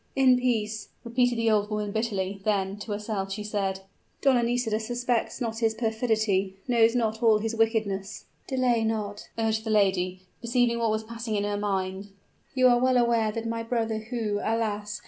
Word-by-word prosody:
"In 260 -2 +5
peace!" 220 -4 -1
repeated 245 0 +1
the 230 -1 +2
old 210 -1 +2
woman 210 -1 -2
bitterly: 200 -3 -2
then, 195 -2 0
to 210 +1 -7
herself 205 -2 -3
she 210 +2 -4
said, 195 -2 -2 0.4
"Donna 265 -3 +4
Nisida 235 -2 0
suspects 240 +1 -1
not 225 -2 -3
his 225 -1 +1
perfidy 220 -4 0
knows 230 -1 +4
not 220 -2 0
all 225 -2 +5
his 220 +1 -2
wickedness." 215 -3 -1 0.2
"Delay 250 -3 +1
not," 210 -2 -3
urged 220 -1 0
the 220 - -4
lady, 190 -3 +2 0.2
perceiving 235 0 +1
what 230 -1 +1
was 215 0 0
passing 230 0 -5
in 205 - 0
her 205 0 -1
mind. 195 -1 -2 0.5
"You 255 -1 +5
are 240 0 +4
well 255 0 +3
aware 235 -3 +2
that 230 +1 -4
my 230 0 -2
brother, 225 -1 -1
who, 220 -2 -2
alas! 210 -2 -1
220 Hz, 175 wpm, -27 LUFS, 205-235 Hz, 0.5 s, In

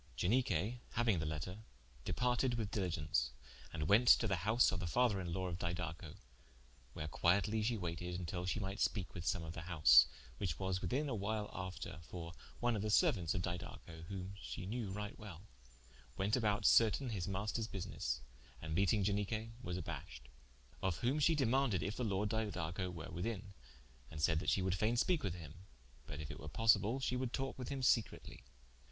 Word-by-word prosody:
Ianique 110 +1 +1 0.2
hauing 115 -6 +2
the 80 - -2
letter, 80 +6 -4 0.5
departed 125 0 +1
with 110 -3 -3
diligence, 85 -6 0 0.4
and 75 0 -2
went 115 +6 +5
to 115 - +7
the 100 -4 +1
house 110 +8 +3
of 90 - -2
the 90 - -3
father 110 0 +2
in 85 -2 -4
lawe 95 +1 -2
of 85 0 -4
Didaco, 85 -2 -4 0.8
where 75 - -4
quietly 100 +8 +2
shee 115 +2 +1
waited 90 -1 -4
till 90 +2 -3
shee 100 - 0
mighte 100 0 -4
speake 100 -5 0
with 85 0 -6
some 90 - +1
of 80 0 -6
the 85 - -6
house, 70 -8 +7 0.3
which 95 - -1
was 95 -1 -1
within 145 +4 0
a 135 - -2
while 105 0 -2
after: 95 -3 -5
for 85 +2 -7 0.3
one 120 -1 +2
of 105 - -1
the 110 - -1
seruauntes 95 -5 +3
of 90 - -1
Didaco 85 -2 -6
whom 95 0 -5
she 100 - -6
knew 110 +1 -3
right 105 +1 -5
well, 95 -4 -9 0.7
wente 100 +3 +2
about 105 -3 +1
certaine 115 +3 +5
his 95 -4 -2
maisters 105 +3 -2
busines, 65 - -3 0.4
and 80 -1 -5
meeting 100 +4 +3
Ianique 105 +3 -1
was 90 -7 -3
abashed. 75 -7 -7 0.5
Of 95 -2 0
whom 135 +5 +2
she 160 +2 +4
demaunded 130 - +2
if 100 +5 -2
the 125 - -2
Lord 105 -1 0
Didaco 95 -5 -2
were 85 -2 -7
within, 100 +1 -4 0.6
and 80 - -8
saide 80 +1 +3
that - - -1
she 95 - +2
would 95 -1 +1
faine 110 +5 +1
speake 175 +6 +2
with 95 -4 -2
him: 85 +3 -11 0.4
but 75 - -6
if 75 -2 -5
it - - -8
were 75 - -7
possible 115 - +3
she 130 -1 0
would 125 -1 -1
talke 135 0 -3
with 125 - -4
him 135 -2 -3
secretly. 115 -3 +1
95 Hz, 190 wpm, -37 LUFS, 85-110 Hz, 0.8 s, to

